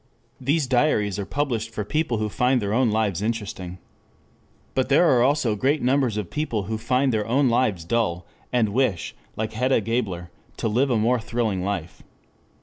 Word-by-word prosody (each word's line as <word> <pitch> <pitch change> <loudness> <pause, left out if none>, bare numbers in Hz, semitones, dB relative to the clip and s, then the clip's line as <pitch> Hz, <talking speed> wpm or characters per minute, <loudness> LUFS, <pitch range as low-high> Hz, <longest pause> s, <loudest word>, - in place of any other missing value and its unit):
These 140 +3 +1
diaries 120 -7 +1
are 100 - -4
published 125 -6 -1
for 110 -2 -4
people 150 -1 0
who 110 0 -1
find 125 +4 +2
their 100 -2 -2
own 125 0 +3
lives 105 -4 0
interesting. 105 -5 -4 1.0
But 130 - 0
there 145 +5 +5
are 125 -6 +4
also 125 -4 +2
great 140 +8 +1
numbers 130 -3 +2
of 105 -5 -4
people 135 -9 -2
who 110 +3 -4
find 125 +3 +1
their 110 -1 0
own 130 +3 +3
lives 110 -8 +1
dull, 90 -5 0 0.3
and 120 -4 +2
wish, 105 - 0 0.2
like 110 0 -3
Hedda 125 +2 +2
Gabler, 100 -6 -2 0.3
to - - -1
live 125 +6 +2
a 120 - +2
more 120 +3 +2
thrilling 110 -4 -1
life. 90 -4 -4
115 Hz, 175 wpm, -24 LUFS, 105-130 Hz, 1.0 s, there